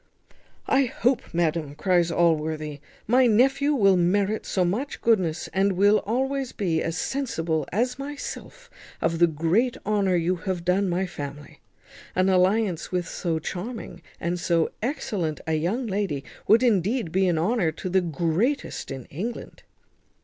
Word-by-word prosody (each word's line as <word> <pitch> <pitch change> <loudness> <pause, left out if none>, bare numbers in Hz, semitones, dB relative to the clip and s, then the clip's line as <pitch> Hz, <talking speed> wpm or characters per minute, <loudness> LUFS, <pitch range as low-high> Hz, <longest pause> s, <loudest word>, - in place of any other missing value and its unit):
"I 270 0 +3
hope, 250 +1 0
madam," 160 -3 -1
cries 175 +1 +2
Allworthy, 155 -3 0 0.3
"my 250 +3 +4
nephew 270 +6 +3
will 195 -6 +5
merit 195 +4 +1
so 185 -2 +1
much 230 +11 -2
goodness, 185 -8 +1
and 195 +1 +2
will 205 +3 +4
be - - -12
always 265 +3 -1 0.3
as 165 0 -2
sensible 165 - -2
as 250 +6 0
myself 290 - -7 0.3
of 165 0 0
the 170 - +6
great 170 - +1
honour 200 -3 +2
you 175 +2 +1
have 180 -1 -4
done 185 +2 +2
my 180 +2 0
family. 145 -4 -8 0.6
An 185 +1 +3
alliance 185 -1 +2
with 180 -2 -1
so 165 -2 -2
charming 185 +3 -6 0.2
and 175 +1 -2
so 170 -2 +1
excellent 210 - -2
a 160 - -1
young 180 +12 0
lady 195 -9 -2 0.2
would 225 +4 +5
indeed 215 -3 +1
be 190 +1 +2
an 175 -2 +1
honour 180 0 +1
to 175 - -6
the 185 +1 +2
greatest 175 - -1
in 135 -3 -6
England." 220 +11 -6
185 Hz, 150 wpm, -25 LUFS, 165-230 Hz, 0.6 s, the